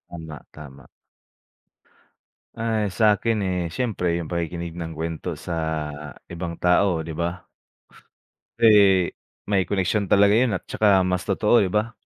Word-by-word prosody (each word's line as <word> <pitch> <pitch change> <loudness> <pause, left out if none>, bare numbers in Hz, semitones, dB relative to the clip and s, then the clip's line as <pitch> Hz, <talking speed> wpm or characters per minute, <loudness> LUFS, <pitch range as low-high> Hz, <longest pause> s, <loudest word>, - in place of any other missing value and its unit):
Tama, 80 -3 -9 0.2
tama. 70 -3 -12 1.7
Ay 110 -3 -1
sakin, 110 +3 +2
eh, 90 -1 -1
siyempre 90 -7 -1
yung 85 - -6
pakikinig 85 0 -4
ng 85 -2 -5
kwento 80 0 -5
sa 85 - -6 0.7
ibang 85 -1 -6
tao 90 0 +2
di 80 0 -6
ba? 85 +2 -4 1.1
Pre 115 - +6 0.8
may 95 -2 +2
koneksyon 100 +1 0
talaga 100 0 +5
yun 120 +1 +3
at 90 - -5
'tsaka 100 -3 +3
mas 90 0 -1
totoo 105 +3 +3
di - - -2
ba? 105 +3 0
90 Hz, 130 wpm, -23 LUFS, 85-105 Hz, 1.7 s, Pre